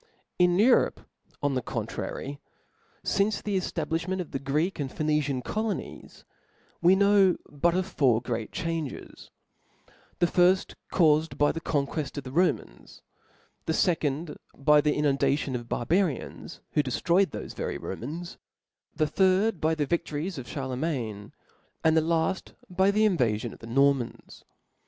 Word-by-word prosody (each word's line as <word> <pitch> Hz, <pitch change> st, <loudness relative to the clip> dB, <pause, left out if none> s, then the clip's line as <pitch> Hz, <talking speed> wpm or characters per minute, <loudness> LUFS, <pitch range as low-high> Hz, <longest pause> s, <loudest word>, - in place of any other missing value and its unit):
Chap. 475 Hz, -, -35 dB
^ -, -, -36 dB, 0.3 s
In 180 Hz, 0 st, +4 dB
Europe, 240 Hz, +5 st, +4 dB, 0.4 s
on 145 Hz, -1 st, +1 dB
the 130 Hz, -, 0 dB
contrary, 140 Hz, +3 st, -5 dB, 0.7 s
fince 200 Hz, +1 st, +1 dB
the 205 Hz, -1 st, -3 dB
eftablifh 165 Hz, -2 st, -2 dB
ment 190 Hz, 0 st, -1 dB
of 175 Hz, -, -5 dB
the 135 Hz, -, -3 dB
Greek 150 Hz, +7 st, -1 dB
and 135 Hz, -3 st, -3 dB
Phoenician 150 Hz, -4 st, 0 dB
cplonies 215 Hz, 0 st, -4 dB, 0.6 s
we; 180 Hz, +3 st, +6 dB
know 200 Hz, -2 st, +4 dB
but 170 Hz, +4 st, +1 dB
of 185 Hz, 0 st, +1 dB
four 135 Hz, -11 st, +2 dB
great 115 Hz, -2 st, -4 dB
changes 165 Hz, -4 st, -5 dB, 0.6 s
5 -, -, -28 dB, 0.2 s
the -, -, +3 dB
firft 180 Hz, +2 st, +3 dB, 0.2 s
caufed 155 Hz, -2 st, +3 dB
by 145 Hz, 0 st, +3 dB
the 165 Hz, -, -5 dB
qonqucft 145 Hz, -2 st, -2 dB
of 145 Hz, -, -4 dB
the 130 Hz, -, -8 dB
Romans; 175 Hz, +6 st, -1 dB, 0.6 s
the 160 Hz, -, +1 dB
fecond 160 Hz, -2 st, 0 dB, 0.2 s
by 150 Hz, +2 st, +5 dB
the 150 Hz, 0 st, +1 dB
inundation 140 Hz, -1 st, +1 dB
of 120 Hz, -1 st, -6 dB
barbarians, 165 Hz, +2 st, -1 dB
who 150 Hz, -, +3 dB
deftroyed 170 Hz, +8 st, +2 dB
thpfe -, -, -7 dB
very -, -, -3 dB
Romans 170 Hz, -, -6 dB
j -, -, -16 dB, 0.6 s
the 155 Hz, -2 st, +1 dB
third 190 Hz, +3 st, +2 dB
by 160 Hz, +1 st, +2 dB
the 150 Hz, -2 st, 0 dB
viftories 165 Hz, +1 st, -2 dB
of 120 Hz, -, -8 dB
Charle 130 Hz, -3 st, -4 dB
niain 125 Hz, -9 st, -3 dB
5 -, -, -17 dB, 0.5 s
and 160 Hz, 0 st, +4 dB
the 160 Hz, -, +5 dB
la 165 Hz, +2 st, +1 dB
ft 190 Hz, -, -14 dB, 0.2 s
by 190 Hz, +2 st, +3 dB
the 215 Hz, +2 st, +4 dB
invafions 120 Hz, -, 0 dB
of -, -, -14 dB
the 115 Hz, -, -10 dB
Nor 140 Hz, +4 st, +4 dB
mans. 125 Hz, -4 st, -8 dB
155 Hz, 160 wpm, -27 LUFS, 140-180 Hz, 0.7 s, we